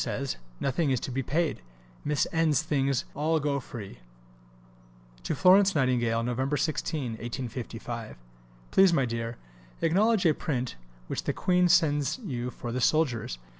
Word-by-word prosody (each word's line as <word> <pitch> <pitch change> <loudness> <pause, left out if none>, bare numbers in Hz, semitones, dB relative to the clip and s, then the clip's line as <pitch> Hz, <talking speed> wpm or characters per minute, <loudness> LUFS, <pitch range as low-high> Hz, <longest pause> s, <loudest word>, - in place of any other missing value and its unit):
says, 140 -1 -3 0.2
nothing 140 +3 0
is 130 -2 +1
to 130 - -5
be 135 +2 -1
paid, 160 +5 -1 0.4
Miss 150 -1 +1
N.'s 160 -3 +2
things 140 -4 0
all 155 +2 +1
go 140 -1 0
free. 105 - -9 1.2
(To - - -2
Florence 195 +1 +5
Nightingale.) 120 -4 +2
[Nov. 130 +4 -1
16, 155 -4 -1
1855.] 120 - -6 0.5
Please, 195 -1 +6
my 135 -5 +3
dear, 115 0 -4 0.4
acknowledge 200 +5 +3
a 160 - +5
print 130 -5 -3 0.3
which - - -4
the - - 0
Queen 180 -1 +2
sends 150 - +3
you 130 - -4
for 120 -1 -6
the 125 +2 -2
soldiers. 120 - +1
140 Hz, 140 wpm, -28 LUFS, 120-160 Hz, 1.2 s, Please